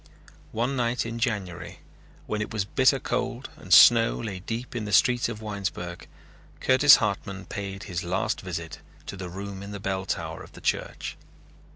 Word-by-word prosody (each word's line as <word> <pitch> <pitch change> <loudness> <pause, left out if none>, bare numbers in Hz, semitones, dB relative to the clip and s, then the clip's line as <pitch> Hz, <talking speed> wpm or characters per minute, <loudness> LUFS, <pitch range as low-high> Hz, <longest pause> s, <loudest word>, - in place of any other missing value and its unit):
One 120 +5 -1
night 120 -1 0
in 115 0 -5
January 90 -6 -3 0.5
when 105 0 -2
it 105 - -4
was 105 -3 -1
bitter 130 +5 +3
cold 125 +1 -3
and 90 - -13
snow 115 +5 +8
lay 105 -5 -5
deep 115 +6 -5
on 115 -3 -2
the 105 - -5
streets 120 +2 +4
of 110 -1 -7
Winesburg 95 -4 -5 0.5
Curtis 135 +3 +7
Hartman 100 -3 -2
paid 100 -1 -6
his 90 -3 -4
last 95 +5 -1
visit 85 -5 -6 0.3
to - - -6
the 90 -2 -6
room 100 +1 -7
in 100 - -8
the 100 - -5
bell 95 -1 -3
tower - - -3
of - - -13
the - - -11
church. - - -2
105 Hz, 175 wpm, -26 LUFS, 95-115 Hz, 0.5 s, snow